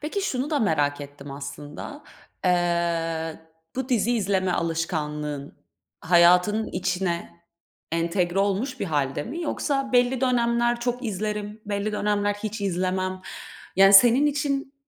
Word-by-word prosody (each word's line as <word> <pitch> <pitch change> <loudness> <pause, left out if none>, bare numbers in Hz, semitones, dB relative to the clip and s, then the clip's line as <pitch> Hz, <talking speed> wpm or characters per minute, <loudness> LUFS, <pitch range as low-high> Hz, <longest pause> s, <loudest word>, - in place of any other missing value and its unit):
Peki, 310 +7 -3
şunu 275 -6 -2
da 300 - +1
merak 145 - +1
ettim 145 0 -10
aslında. 145 - -8 0.4
Eee, 170 -2 0 0.4
bu 260 -1 -2
dizi 240 -2 +2
izleme 190 -3 0
alışkanlığın 150 -4 -3 0.5
hayatının 180 +5 +4
içine 180 -2 -3 0.5
entegre 175 +2 0
olmuş 205 +7 0
bir - - 0
hâlde 145 -4 -1
mi? 315 - -5
Yoksa 275 -4 -1
belli 245 +1 +3
dönemler 240 -1 +2
çok 245 +1 -2
izlerim, 210 0 -3
belli 205 +1 -2
dönemler 205 0 0
hiç 215 +1 -5
izlemem. 185 0 -1 0.6
Yani, 195 +1 +7
senin 240 +7 +7
için 285 -1 -1
195 Hz, 120 wpm, -25 LUFS, 170-240 Hz, 0.6 s, Yani